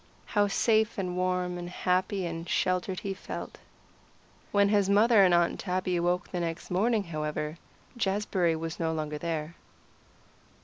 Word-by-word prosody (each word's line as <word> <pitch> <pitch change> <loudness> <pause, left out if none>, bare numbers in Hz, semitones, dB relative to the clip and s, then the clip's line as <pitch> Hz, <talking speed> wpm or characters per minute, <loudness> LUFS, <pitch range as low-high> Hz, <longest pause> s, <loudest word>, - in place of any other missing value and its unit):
How 205 -1 +2
safe 220 +2 +2
and 180 -2 -2
warm 180 -1 -1
and 175 0 -6
happy 185 +2 0
and 165 0 -5
sheltered 185 0 0
he 195 - -3
felt. 190 - -7 0.9
When 200 -1 +4
his 200 -2 +3
mother 210 +1 +6
and 185 - +5
Aunt 175 0 +2
Tabby 185 -1 -1
awoke 175 +1 0
the 180 - -2
next 165 0 -4
morning, 215 +4 +2
however, 155 -1 -4 0.4
Jazbury 195 -5 +1
was 165 0 -5
no 165 -1 0
longer 150 -1 -3
there. 160 -1 -3
180 Hz, 145 wpm, -29 LUFS, 170-200 Hz, 0.9 s, mother